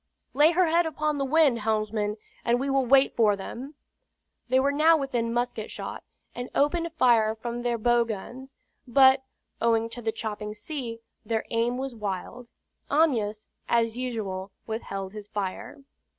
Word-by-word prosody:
"Lay 295 Hz, +3 st, +6 dB
her 365 Hz, +2 st, +4 dB
head 335 Hz, +1 st, +3 dB
upon 305 Hz, -1 st, -1 dB
the -, -, +1 dB
wind, 280 Hz, -4 st, +4 dB
helmsman, 215 Hz, -1 st, -1 dB, 0.3 s
and 240 Hz, +1 st, +2 dB
we 275 Hz, +1 st, -1 dB
will 270 Hz, -2 st, +2 dB
wait 270 Hz, +2 st, +5 dB
for 215 Hz, -3 st, +4 dB
them." 255 Hz, +9 st, -8 dB, 0.7 s
They 260 Hz, +1 st, +4 dB
were 275 Hz, +2 st, +2 dB
now 315 Hz, +3 st, +5 dB
within 245 Hz, -5 st, -1 dB
musket 240 Hz, -2 st, -2 dB
shot, -, -, -6 dB, 0.3 s
and 245 Hz, 0 st, -6 dB
opened 335 Hz, +4 st, +1 dB
fire 230 Hz, -7 st, +3 dB
from 235 Hz, +2 st, -5 dB
their 240 Hz, -1 st, 0 dB
bow 240 Hz, +1 st, +3 dB
guns; 245 Hz, +5 st, -7 dB, 0.3 s
but, 265 Hz, +1 st, +6 dB, 0.4 s
owing 230 Hz, -1 st, +2 dB
to 240 Hz, -, -7 dB
the 225 Hz, -1 st, -1 dB
chopping 210 Hz, -1 st, -5 dB
sea, 230 Hz, -1 st, -6 dB, 0.2 s
their 220 Hz, 0 st, -2 dB
aim 235 Hz, +1 st, +1 dB
was 265 Hz, 0 st, -4 dB
wild. 215 Hz, +3 st, -5 dB, 0.4 s
Amyas, 230 Hz, -9 st, +1 dB, 0.2 s
as 230 Hz, -1 st, +2 dB
usual, 210 Hz, -7 st, -4 dB
withheld 195 Hz, -3 st, -5 dB
his 210 Hz, -1 st, -8 dB
fire. 200 Hz, +6 st, -4 dB
235 Hz, 155 wpm, -27 LUFS, 220-270 Hz, 0.7 s, Lay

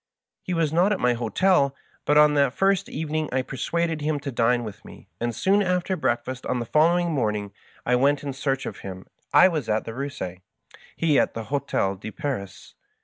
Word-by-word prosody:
He 180 Hz, -, -3 dB
was 160 Hz, -2 st, 0 dB
not 180 Hz, +5 st, +3 dB
at 205 Hz, -, 0 dB
my 125 Hz, 0 st, +3 dB
hotel, 140 Hz, -, +2 dB, 0.3 s
but 150 Hz, -, +3 dB
on 150 Hz, 0 st, +6 dB
that 140 Hz, -3 st, +2 dB
first 195 Hz, -1 st, +2 dB
evening 155 Hz, 0 st, -2 dB
I 130 Hz, 0 st, 0 dB
persuaded 160 Hz, +5 st, -2 dB
him 150 Hz, 0 st, 0 dB
to 140 Hz, -1 st, -4 dB
dine 120 Hz, 0 st, +2 dB
with 105 Hz, -3 st, -8 dB
me, -, -, -14 dB
and 120 Hz, 0 st, -1 dB
tfoon 195 Hz, -, +2 dB
after 180 Hz, 0 st, 0 dB
breakfast 125 Hz, -4 st, -2 dB
on 125 Hz, -, 0 dB
the 120 Hz, -, -3 dB
following 170 Hz, +6 st, +3 dB
morning 105 Hz, -7 st, -1 dB, 0.3 s
I 125 Hz, -, +3 dB
went 140 Hz, +3 st, +2 dB
in 140 Hz, -2 st, -3 dB
search 135 Hz, 0 st, -2 dB
of -, -, -6 dB
him; 95 Hz, -1 st, -8 dB, 0.3 s
I 145 Hz, +5 st, +7 dB
was 155 Hz, -10 st, -2 dB
at 110 Hz, 0 st, 0 dB
the -, -, -5 dB
Eussie, 130 Hz, -9 st, -5 dB, 0.5 s
he 155 Hz, -4 st, +3 dB
at -, -, 0 dB
the 115 Hz, -, -4 dB
Hdtel 100 Hz, -6 st, -1 dB
de 110 Hz, -, -6 dB
Paris. 110 Hz, -, -5 dB
140 Hz, 200 wpm, -24 LUFS, 120-160 Hz, 0.5 s, I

